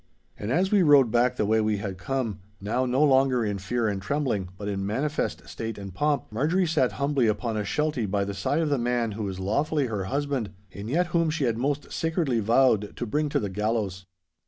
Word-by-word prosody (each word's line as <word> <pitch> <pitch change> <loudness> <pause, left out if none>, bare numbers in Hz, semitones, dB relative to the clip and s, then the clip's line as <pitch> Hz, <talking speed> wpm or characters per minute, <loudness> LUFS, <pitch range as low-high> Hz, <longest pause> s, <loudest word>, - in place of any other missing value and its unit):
And 105 +3 -4
as 185 +7 +2
we 205 -2 +5
rode 145 -8 +6
back 120 +1 +3
the 105 - 0
way 110 +2 +3
we 105 -1 +1
had 95 -2 -5
come—now 105 0 -3
no 130 +4 +2
longer 130 -4 +4
in 100 -1 -2
fear 115 +4 -1
and 100 -2 -2
trembling, 120 -6 -1
but 100 - -6
in 100 -1 -2
manifest 135 +10 -2
state 115 -1 -5
and 100 -2 -8
pomp—Marjorie 150 - +1
sate 155 -6 +1
humbly 140 -3 +1
upon 110 +1 -1
a 105 - -1
sheltie 140 +1 -1
by 100 +1 0
the 100 - -4
side 120 +11 0
of 160 - 0
the 140 -3 +1
man 120 -1 0
who 105 +2 -5
was 95 -1 -4
lawfully 145 +9 0
her 105 -6 -3
husband, 135 -3 -2 0.2
and 100 +3 -7
yet 170 +7 +2
whom 165 -2 +3
she 155 -2 -1
had 115 -3 0
most 145 +3 -2
sacredly 160 -7 0
vowed 115 -1 +3
to 120 - -2
bring 150 +7 0
to - - +1
the 105 - -2
gallows. 105 -2 -2
120 Hz, 210 wpm, -26 LUFS, 105-145 Hz, 0.2 s, rode